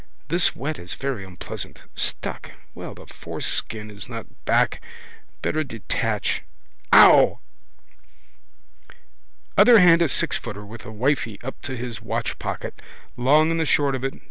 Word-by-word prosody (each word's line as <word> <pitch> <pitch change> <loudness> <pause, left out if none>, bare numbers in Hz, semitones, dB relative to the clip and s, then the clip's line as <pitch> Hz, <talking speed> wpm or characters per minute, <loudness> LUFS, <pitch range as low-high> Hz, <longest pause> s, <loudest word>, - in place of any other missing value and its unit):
This 170 +3 +2
wet 145 +5 -4
is 85 - -6
very 135 -7 -3
unpleasant. 95 -2 -7
Stuck. - - -3 0.2
Well - - -8
the - - -13
foreskin 105 -1 -3
is 105 +3 -10
not 115 -3 -6 0.2
back. - - +2 0.6
Better 155 0 0
detach. 115 -7 -2 0.5
Ow! - - +8 2.2
Other 225 +4 +8
hand 170 -2 +6
a - - +5
sixfooter 105 -7 -2
with 115 +2 -11
a - - -7
wifey 115 -1 -1
up 135 - -7
to 130 -2 -5
his 120 -2 -5
watchpocket. 110 - -4 0.3
Long 150 +6 +4
and 165 - 0
the 160 - +1
short 140 -1 +2
of 130 -1 -3
it. 135 - -2
130 Hz, 135 wpm, -23 LUFS, 110-155 Hz, 2.2 s, Ow